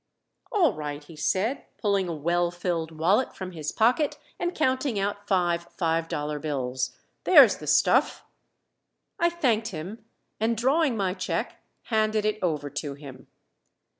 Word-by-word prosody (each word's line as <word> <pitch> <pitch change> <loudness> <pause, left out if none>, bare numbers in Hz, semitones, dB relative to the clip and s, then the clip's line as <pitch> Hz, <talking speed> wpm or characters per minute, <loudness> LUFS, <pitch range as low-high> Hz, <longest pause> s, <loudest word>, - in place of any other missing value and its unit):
"All 345 - +3
right," 150 -2 -5
he 160 +2 -13
said, 195 - 0
pulling 200 -4 0
a - - -2
well 170 +3 +1
filled 175 -2 -2
wallet 170 +10 +1
from 185 -1 -6
his 155 -3 -4
pocket, 250 +7 +2 0.2
and 350 0 -2
counting 260 -4 0
out 205 +1 -2
five 175 -3 +1
five 165 -1 0
dollar 150 -1 -3
bills. 130 -4 -3 0.3
"There's - - +7
the - - -9
stuff." - - +3 0.9
I 340 - +4
thanked 250 -10 +1
him, 195 +4 -7 0.4
and 225 +1 +1
drawing 265 +2 +2
my 190 -3 0
check 185 -1 -3 0.2
handed 215 -1 +1
it 215 0 0
over 150 -5 -1
to 140 0 -4
him. 135 -3 -12
185 Hz, 145 wpm, -26 LUFS, 155-225 Hz, 0.9 s, There's